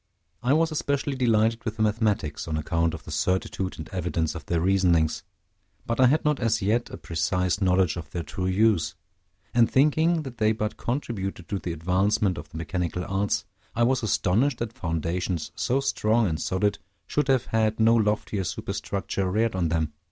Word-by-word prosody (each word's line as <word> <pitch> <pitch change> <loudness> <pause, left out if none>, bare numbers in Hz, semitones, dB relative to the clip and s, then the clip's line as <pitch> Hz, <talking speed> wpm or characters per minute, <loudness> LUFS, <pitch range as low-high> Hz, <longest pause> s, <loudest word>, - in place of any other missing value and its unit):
I 125 +3 +2
was 160 +1 +2
especially 140 -2 -1
delighted 115 -2 +2
with 110 0 -4
the 110 - +1
mathematics, 105 -9 0
on 80 -1 -1
account 80 +1 0
of - - -10
the - - -9
certitude 95 0 -1
and 80 - -7
evidence 85 -3 -1
of 80 - -7
their 85 - +1
reasonings; 90 -3 +2 0.6
but 115 +1 -2
I 130 - +7
had 150 +5 +2
not 150 -2 +2
as 115 -2 +1
yet 110 +5 0
a - - -7
precise 90 +4 -1
knowledge 90 -3 +2
of 85 - -7
their 85 -2 -4
true 90 +5 -3
use; 100 -1 +2 0.6
and 120 -2 +4
thinking 155 +4 +3
that 125 -4 -9
they 110 0 +3
but 105 0 -3
contributed 100 - -3
to 100 - -1
the 90 - -4
advancement 95 +3 +1
of 75 0 -10
the 80 - -9
mechanical 90 +1 -2
arts, 100 +1 0 0.3
I 120 - +2
was 130 +1 +2
astonished 115 +5 +1
that 115 -1 -4
foundations, 85 0 -2
so 130 +3 0
strong 115 -4 +2
and 80 -2 -2
solid, 100 +2 0 0.3
should 150 -1 0
have 130 -3 +2
had 110 -1 0
no 110 +1 +5
loftier 105 -2 +1
superstructure 95 +2 -3
reared 110 +4 +1
on 90 -3 +1
them. 80 -2 -1
100 Hz, 180 wpm, -26 LUFS, 90-115 Hz, 0.6 s, I